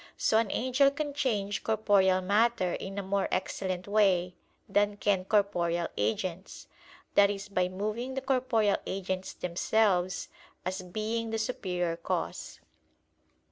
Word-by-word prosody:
So 220 - +3
an 225 -3 0
angel 260 +5 +3
can 290 +1 -4
change 210 -8 -1
corporeal 200 -4 +3
matter 200 -1 +2
in 195 +1 -5
a 200 - -2
more 195 +1 0
excellent 185 0 -2
way 190 -4 +3 0.3
than 205 0 +1
can 195 -3 +1
corporeal 175 -5 +1
agents, 170 - -3 0.5
that 200 0 +6
is 200 0 -4
by 185 -3 0
moving 215 +7 -3
the 265 - -2
corporeal 250 -6 +2
agents 190 -1 -3
themselves, 180 0 +1 0.4
as 185 +1 -2
being 215 +5 -3
the 225 - -1
superior 180 -7 -2
cause. 170 - -4
200 Hz, 130 wpm, -29 LUFS, 185-220 Hz, 0.5 s, that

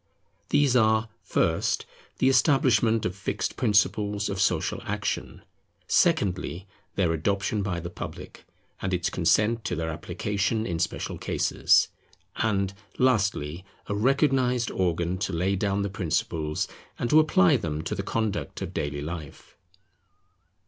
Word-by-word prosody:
These 140 -3 +3
are, 110 -1 +3
first, - - 0 0.3
the 130 - +2
establishment 125 -5 +3
of 90 +1 -2
fixed 100 - -3
principles 105 -2 +1
of 100 0 -2
social 95 - +1
action; - - -3 0.4
secondly, 95 -1 +1 0.3
their 90 -4 +2
adoption 100 +5 0
by 95 -3 -2
the 85 +1 -6
public, - - -8 0.4
and 95 -1 0
its 90 - -1
consent 110 +6 +2
to 90 - -1
their 80 0 -2
application 105 +7 -2
in 85 -5 -2
special 80 0 -2
cases; - - +2 0.5
and, 100 -3 0 0.2
lastly, 100 - +1 0.2
a - - -3
recognized 125 0 +2
organ 85 0 0
to 95 -1 -2
lay 90 +4 +1
down 100 +1 0
the - - 0
principles, 80 -4 -1 0.3
and 120 - -2
to 155 - +7
apply 95 -12 +4
them 75 -1 -2
to - - -3
the 100 - -2
conduct 110 +1 -2
of - - -6
daily 70 0 -3
life. 80 -2 -8
100 Hz, 135 wpm, -26 LUFS, 85-110 Hz, 0.5 s, to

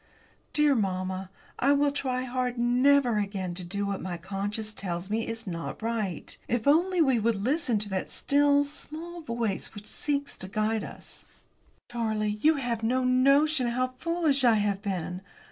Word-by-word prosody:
Dear 300 -1 +4
mamma, 190 -4 -1 0.3
I 275 +3 +4
will 285 0 +3
try 255 -3 -1
hard 250 -1 -2
never 245 0 +4
again 195 -3 -3
to 180 +1 -6
do 200 +3 -3
what 200 -1 -2
my 180 -2 -4
conscience 205 +4 -4
tells 180 -1 -4
me 225 +1 0
is 230 0 -5
not 170 -3 -5
right. 220 -7 -2
If 240 -1 -1
only 345 +4 +4
we 265 -5 +3
would 225 +1 +2
always 200 +1 -4
listen 260 -8 0
to 205 0 -3
the 190 -1 -1
still 285 0 +3
small 320 +4 -8
voice 235 -8 -3
which 205 0 -9
seeks 285 +4 -2
to 185 - -7
guide 215 +2 0
us! - - -10 0.7
"Charlie, 215 -3 -1
you 315 +4 +5
have 240 -5 -2
no 255 +3 +1
notion 275 +2 +4
how 255 +2 0
foolish 305 +1 0
I 235 -3 +6
have 205 -2 0
been! 185 -3 -3
230 Hz, 170 wpm, -28 LUFS, 200-280 Hz, 0.7 s, I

